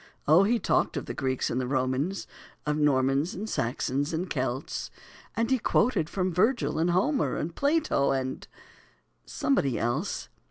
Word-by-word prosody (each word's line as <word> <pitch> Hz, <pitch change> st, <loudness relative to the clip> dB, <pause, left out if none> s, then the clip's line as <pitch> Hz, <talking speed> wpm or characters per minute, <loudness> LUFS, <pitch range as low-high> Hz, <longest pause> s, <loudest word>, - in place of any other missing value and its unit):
O, 155 Hz, +5 st, +7 dB
he 235 Hz, +4 st, +3 dB
talked -, -, +1 dB
of -, -, -3 dB
the -, -, -5 dB
Greeks 130 Hz, -1 st, -1 dB
and 130 Hz, -, 0 dB
the 125 Hz, -, -3 dB
Romans, 130 Hz, +8 st, -1 dB, 0.4 s
Of 150 Hz, 0 st, 0 dB
Normans, 140 Hz, +1 st, +2 dB
and 210 Hz, +4 st, -5 dB
Saxons, 135 Hz, -, -1 dB
and 170 Hz, +4 st, -1 dB
Celts, 130 Hz, 0 st, -2 dB, 0.5 s
And 230 Hz, +3 st, 0 dB
he 260 Hz, -, +3 dB
quoted 205 Hz, -9 st, +2 dB
from 185 Hz, -2 st, -1 dB
Virgil, 225 Hz, 0 st, +1 dB
and 165 Hz, +2 st, +2 dB
Homer, 230 Hz, -, +1 dB
And 165 Hz, +2 st, -3 dB
Plato, 290 Hz, -, +2 dB
and 130 Hz, -1 st, -2 dB, 0.8 s
somebody 140 Hz, -, +1 dB
else. 135 Hz, -, -2 dB
155 Hz, 155 wpm, -28 LUFS, 130-200 Hz, 0.8 s, O